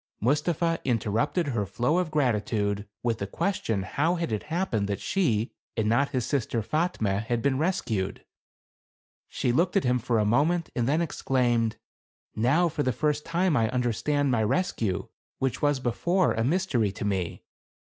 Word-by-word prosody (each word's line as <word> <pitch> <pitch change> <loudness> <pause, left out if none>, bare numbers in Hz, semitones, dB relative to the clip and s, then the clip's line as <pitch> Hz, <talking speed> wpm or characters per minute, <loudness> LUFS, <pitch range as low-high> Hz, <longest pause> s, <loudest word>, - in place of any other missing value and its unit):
Mustapha 160 - +1
interrupted 125 - 0
her 115 -6 0
flow 120 - 0
of 180 -3 -1
gratitude, 105 -7 0 0.2
with 115 -2 0
the 100 - -3
question 110 - -1
how 155 - 0
had 170 -8 -2
it 105 - -1
happened 160 - 0
that 100 -1 -2
she 120 - 0 0.3
and 110 -1 +1
not 120 +6 +2
his 130 -4 -1
sister 120 -5 -1
Fatme 110 - 0
had 115 +1 -2
been 135 -1 +1
rescued? 120 - -1 1.0
She 125 - -1
looked 170 +9 +2
at 195 - +2
him 125 0 +2
for 120 0 0
a 105 - +2
moment 155 +10 +2
and 120 -1 0
then 155 +5 +2
ex 165 - -6
claimed, 120 -4 +2 0.6
"Now, 135 +11 +3
for 155 -2 -2
the 130 - +1
first 150 +5 -1
time, 170 0 +1
I 115 -3 +2
understand 130 +3 0
my 115 -3 +2
rescue, 110 - 0 0.3
which 130 -3 -1
was 145 -2 +2
before 170 +10 +1
a 115 - 0
mystery 130 - +1
to 100 - -5
me. 95 -4 -2
125 Hz, 170 wpm, -27 LUFS, 110-160 Hz, 1.0 s, Now